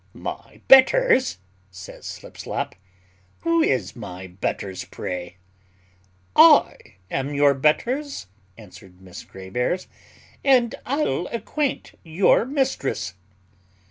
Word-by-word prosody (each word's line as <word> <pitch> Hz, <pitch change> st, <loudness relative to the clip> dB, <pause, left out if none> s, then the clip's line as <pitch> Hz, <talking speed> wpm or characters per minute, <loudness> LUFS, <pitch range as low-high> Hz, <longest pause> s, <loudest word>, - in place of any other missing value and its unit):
"My -, -, -8 dB
betters," 270 Hz, -, +5 dB, 0.3 s
says 95 Hz, 0 st, -11 dB
Slipslop, -, -, -6 dB, 0.7 s
"who 335 Hz, 0 st, +2 dB
is 130 Hz, -, 0 dB
my 95 Hz, -5 st, -8 dB
betters, 95 Hz, +1 st, -4 dB
pray?" 90 Hz, 0 st, -6 dB, 1.0 s
"I -, -, +5 dB, 0.2 s
am 135 Hz, +2 st, -2 dB
your 140 Hz, 0 st, +4 dB
betters," 240 Hz, -, 0 dB, 0.3 s
answered 95 Hz, -4 st, -15 dB
Miss 95 Hz, -2 st, -11 dB
Grave 95 Hz, 0 st, -12 dB
airs, 150 Hz, +9 st, -1 dB, 0.6 s
"and 250 Hz, -4 st, +4 dB
I'll 245 Hz, -, -1 dB
acquaint 270 Hz, +5 st, -3 dB
your 170 Hz, +7 st, +3 dB
mistress." 260 Hz, -, -2 dB
145 Hz, 95 wpm, -23 LUFS, -, 1.0 s, betters